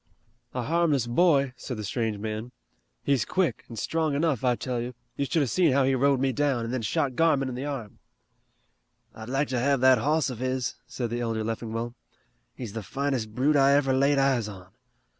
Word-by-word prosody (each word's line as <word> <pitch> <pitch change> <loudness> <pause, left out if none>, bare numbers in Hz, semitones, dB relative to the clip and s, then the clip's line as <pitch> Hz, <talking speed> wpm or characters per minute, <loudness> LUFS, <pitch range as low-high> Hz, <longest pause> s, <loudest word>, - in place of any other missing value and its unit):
"A 125 - -1
harmless 155 -3 +2
boy," 140 0 +3
said 125 0 -6
the 105 - -5
strange 110 0 -2
man. 110 +3 -5 0.5
"He's 135 -5 +2
quick, 180 -11 -1
an' 115 - -8
strong 155 +5 -1
enough, 145 -5 0
I 125 -1 +3
tell 125 -1 -3
you. 125 +1 -6 0.2
You 140 - -1
should 160 +2 +1
have 130 - -2
seen 170 -7 +3
how 140 0 +4
he 135 +1 +2
rode 135 +1 +3
me 135 0 +1
down, 130 -2 0
and 115 - -4
then 130 - -1
shot 125 +4 -1
Garmon 145 -4 +2
in - - -5
the 130 +3 -4
arm." 125 -8 -6 1.1
"I'd 110 +1 -9
like 135 +3 0
to 130 -2 0
have 140 +2 +2
that 130 0 +6
hoss 150 -1 +1
of 120 - -7
his," 130 -1 -1
said 120 -3 -4
the 120 +1 -2
elder 115 -2 -1
Leffingwell. 115 +1 -3 0.6
"He's 115 -6 -7
the 115 - -4
finest 125 -1 -2
brute 140 +4 +2
I 140 0 +5
ever 135 -2 +2
laid 140 +2 +3
eyes 135 -5 +2
on. 95 -3 -10
130 Hz, 205 wpm, -27 LUFS, 115-140 Hz, 1.1 s, that